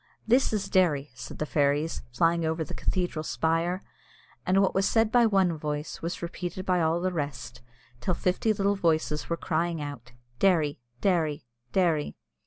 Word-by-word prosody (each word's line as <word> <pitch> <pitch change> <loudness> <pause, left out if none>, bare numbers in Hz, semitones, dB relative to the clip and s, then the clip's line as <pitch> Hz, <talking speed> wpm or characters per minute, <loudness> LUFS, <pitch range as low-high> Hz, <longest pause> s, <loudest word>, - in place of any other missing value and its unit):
"This 250 +4 +3
is 205 -3 -1
Derry," 155 -8 +2
said 125 - -9
the 155 - -2
fairies, 145 +2 +1
flying 165 +7 +2
over 160 0 0
the 150 - -8
cathedral 175 -4 -1
spire; 165 +4 0 0.6
and 190 +1 +4
what 195 - +3
was 195 +1 +2
said 225 -1 +2
by 240 -2 +5
one 190 -5 +2
voice 150 0 -4
was 170 +1 -4
repeated 180 +2 -5
by 180 -1 +2
all 160 +1 +2
the 185 0 0
rest, 145 -8 -4 0.4
till 170 +9 -1
fifty 185 +6 +1
little 200 -1 +1
voices 160 -4 0
were 170 - 0
crying 165 0 -1
out, 130 -5 -7 0.3
"Derry! 160 -8 +3 0.2
Derry! 160 -8 +1 0.3
Derry!" 170 -6 +1
170 Hz, 165 wpm, -27 LUFS, 150-185 Hz, 0.6 s, by